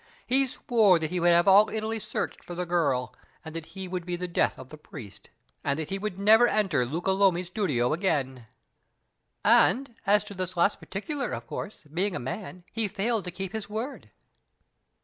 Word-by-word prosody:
He 270 +2 +3
swore 220 -7 +3
that 160 0 -3
he 180 - -1
would 175 0 +4
have 170 +1 +5
all 200 +2 +7
Italy 220 +1 -2
searched - - -4
for 175 - -7
the 180 +1 -2
girl, 145 -8 0 0.3
that 160 0 -6
he 190 +2 -7
would 180 -1 -4
be 175 0 -3
the 180 +1 -4
death 170 - +1
of 130 0 -11
the 155 - -10
priest, 125 -9 -11 0.3
and 140 - 0
that 160 +1 -4
he 195 - -1
would 210 -2 -4
never 220 +4 +6
enter 185 - +1
Luca 170 +8 -1
Lomi's 190 -2 +3
studio 155 - 0
again 135 - -1 0.5
" - - -50
"And, 265 -1 +4
as 205 +1 +5
to 210 -1 -8
this 185 -1 -5
last 170 +4 +3
particular, 255 - -4
of - - -5
course, 210 - -6
being 175 +6 -2
a - - -2
man, 180 - -6
he 225 -1 -1
failed 210 +1 -1
to 180 - -4
keep 190 +1 -5
his 220 -2 -5
word?" 225 +7 -5
185 Hz, 195 wpm, -27 LUFS, 165-210 Hz, 0.5 s, all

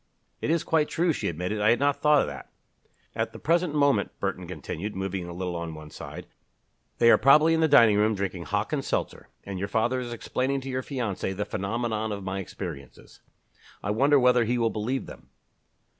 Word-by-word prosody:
"It - - -2
is 165 0 +2
quite 155 -2 +1
true," 170 0 +1
she - - -3
admitted. 90 +6 -3
"I 105 - +4
had 120 - +3
not 140 0 +1
thought 150 -2 +5
of - - -2
that." - - -8 0.7
"At - - -2
the - - -8
present 170 -1 +1
moment," 140 -2 +3
Burton - - -3
continued, 105 +6 -6
moving 95 -2 -3
a - - -7
little 90 0 -4
on 85 -1 -5
one 75 -1 -11
side, - - -8 0.7
"they 115 0 +6
are - - +6
probably 150 +4 +6
in 165 - +2
the 160 - +4
dining 115 -8 +6
room 105 +1 +2
drinking 95 -3 -4
Hock 105 - -2
and 140 -2 -1
seltzer, - - -3 0.2
and 100 -2 -6
your 100 - -2
father 120 +5 0
is 120 -1 -5
explaining 130 +3 -2
to 135 - -7
your 130 0 -2
fiancé 115 -8 -3
the 105 - -1
phenomenon 110 +2 -2
of 100 -1 -5
my 95 +1 -3
experiences. 85 -6 -9 0.6
I 105 - -1
wonder 140 +6 +4
whether 125 -1 +4
he 120 +2 0
will 115 -1 +1
believe 125 +5 -2
them?" - - -13
115 Hz, 205 wpm, -26 LUFS, 95-140 Hz, 0.7 s, they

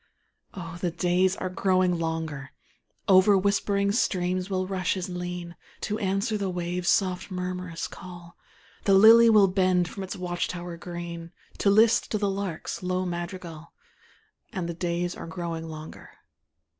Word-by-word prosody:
Oh, 170 -2 -7
the 180 - +1
days 180 +2 +1
are 185 - -4
growing 185 -2 +2
longer; 160 -4 -4 0.5
Over 195 +1 +6
whispering 200 0 +1
streams 185 -3 0
will 185 -1 -1
rushes 185 0 -2
lean, 180 -1 -5 0.3
To 210 +1 -2
answer 200 +2 0
the 195 -1 -1
waves' 175 0 -2
soft 185 -2 +1
murmurous 180 -2 -4
call; 175 -2 -11 0.5
The 195 - +5
lily 225 +3 +8
will 210 -3 +6
bend 185 -2 +2
from 195 - -7
its 190 - -5
watch 175 -1 -2
tower 175 -1 -6
green, 170 -1 -7 0.3
To 200 - +3
list 220 +3 +4
to - - +2
the 200 -1 0
lark's 195 -4 -4
low 185 0 -1
madrigal, 175 -2 -6 0.8
And 180 -3 -3
the 170 - -3
days 175 +1 -2
are - - -8
growing 165 -1 -5
longer. 155 0 -9
180 Hz, 145 wpm, -26 LUFS, 175-195 Hz, 0.8 s, lily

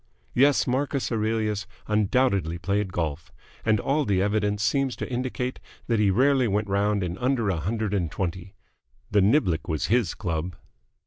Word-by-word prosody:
Yes, 140 +3 +4
Marcus 135 +1 -1
Aurelius 110 -2 -1 0.2
undoubtedly 105 -5 +1
played 100 +2 -1
golf, 80 -3 -3 0.3
and 110 -2 +2
all 145 +6 +1
the 100 -7 +1
evidence 105 +1 0
seems 135 0 +1
to - - -5
indicate 125 0 -3 0.3
that 115 -2 +1
he 105 -2 +4
rarely 130 +4 +3
went 105 0 0
round 100 0 +1
in 90 0 -4
under 125 -4 +1
a 90 - -1
hundred 105 +5 -2
and 90 -5 0
twenty. 95 +2 -4 0.6
The 105 - +4
niblick 95 - +2
was 80 -3 -1
his 115 -9 +1
club. 85 0 -3
105 Hz, 155 wpm, -25 LUFS, 95-125 Hz, 0.6 s, Yes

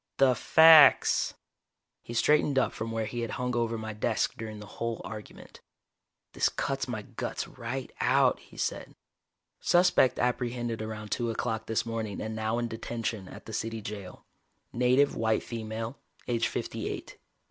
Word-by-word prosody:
"The 135 -2 +5
facts!" 160 +3 +6 0.7
He 120 - -8
straightened 150 +2 +3
up 130 - +2
from 110 +1 -4
where 115 -1 -1
he 120 +2 -5
had 115 -1 -2
hung 125 -1 -2
over 115 -1 0
my 110 0 -5
desk 110 +1 0
during 110 -1 -7
the 105 - -9 0.2
whole 115 -1 -1
argument. 110 -2 -10 0.7
"This - - +2
cuts - - -2
my - - -4
guts - - -5
right 135 -1 -6
out," 130 +1 +3
he - - -17
said. - - -3 0.6
"Suspect 175 -7 +4
apprehended 120 -2 -1
around 110 -1 -6
two 120 -1 0
o'clock 110 -1 -2
this 110 - 0
morning 110 -3 -4
and 110 0 -4
now 110 +1 -1
in 120 0 -1
detention 115 -3 -4
at - - -11
the 110 - -8
City 115 +1 -3
Jail. 100 -3 -8 0.5
Native 125 +3 +3
white 110 -1 +1
female, 115 +2 -5 0.3
age 115 -1 +1
fifty - - -4
eight. - - -7
115 Hz, 160 wpm, -29 LUFS, 110-125 Hz, 0.7 s, facts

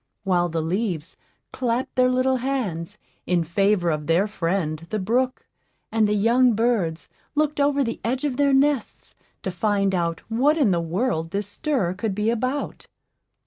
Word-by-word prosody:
while 175 -3 +1
the 165 -1 -2
leaves 180 -2 -2 0.4
"clapped 250 +2 -1
their 255 0 +4
little 255 +1 +2
hands" 235 -11 -3 0.3
in 175 -1 +2
favor 180 +1 +2
of 150 -1 -3
their 170 +4 +3
friend 165 -5 -2
the 215 - -1
brook, 245 +6 0 0.5
and 220 -1 +3
the 210 - +1
young 235 +4 +4
birds 210 -8 0 0.3
looked 300 0 +1
over 280 0 +3
the 230 -2 -4
edge 255 +4 -1
of 285 -4 0
their 285 -1 +3
nests 270 -2 +1 0.3
to 190 - -2
find 200 +1 +1
out 170 -2 -1
what 270 +8 +2
in 265 -10 +3
the 170 -1 +1
world 165 0 -1
this 200 +3 -2
stir 210 - -1
could 200 +1 -3
be 210 +2 +1
about. 255 +5 -3
210 Hz, 165 wpm, -23 LUFS, 175-255 Hz, 0.5 s, their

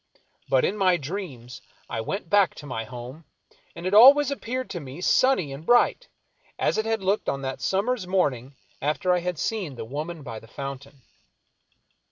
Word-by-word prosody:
But 130 -1 +3
in 205 - -1
my 185 -3 +3
dreams 140 - -7 0.3
I 115 - -3
went 190 - -4
back 200 0 +3
to - - -10
my 125 -5 -4
home, 125 +6 -9 0.5
and 170 +1 -8
it 185 - -1
ahvays 275 +6 +8
appeared 255 -1 -3
to 175 - -4
me 140 +1 -9
sunny 185 - +2
and 140 +3 -9
bright, 245 - +3 0.5
as - - +1
it 220 - -1
had 225 -3 -1
looked 195 +3 0
on 135 0 -3
that 130 0 -4
summer's 200 +1 0
morning 140 -8 0 0.3
after 155 +5 +1
I 180 - +2
had 175 -1 -3
seen 185 -7 -3
the 115 -2 -6
woman 150 +6 -5
by 115 -3 -7
the 115 - -16
fountain. 140 +1 -8
170 Hz, 180 wpm, -25 LUFS, 135-205 Hz, 0.5 s, ahvays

